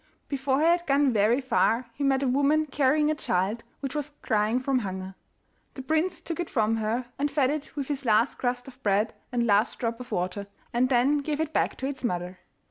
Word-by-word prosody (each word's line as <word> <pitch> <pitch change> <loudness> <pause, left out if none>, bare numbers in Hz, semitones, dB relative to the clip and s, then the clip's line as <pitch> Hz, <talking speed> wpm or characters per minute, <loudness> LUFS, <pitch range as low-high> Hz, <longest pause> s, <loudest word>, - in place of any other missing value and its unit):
Before 270 0 0
he - - +3
had 345 +1 +3
gone 275 -2 +3
very 220 +4 +3
far 255 -2 +1
he 280 - -4
met 275 0 +2
a - - +1
woman 285 +4 +3
carrying 295 +2 +2
a - - +2
child, 210 - -1 0.2
which 275 -2 -4
was 295 0 -4
crying 215 +3 +1
from 260 0 +1
hunger. 190 -3 -5 0.6
The 265 - -7
prince 315 +6 0
took 335 0 -5
it 350 - -2
from 225 -2 +1
her, 225 +3 -1
and 290 +1 +1
fed 275 -2 +2
it 300 0 -5
with 280 -3 -3
his 280 -2 -3
last 225 +1 +2
crust 245 0 -2
of 265 0 -13
bread 205 +1 +1 0.2
and 240 -1 +1
last 210 0 +2
drop 230 -1 -2
of 250 - -9
water, 185 +3 -2 0.3
and 250 +2 +2
then 270 +3 +3
gave 295 +1 -3
it 315 0 -2
back - - 0
to 265 - -4
its 275 -1 -5
mother. 180 -4 -3
260 Hz, 215 wpm, -27 LUFS, 225-285 Hz, 0.6 s, he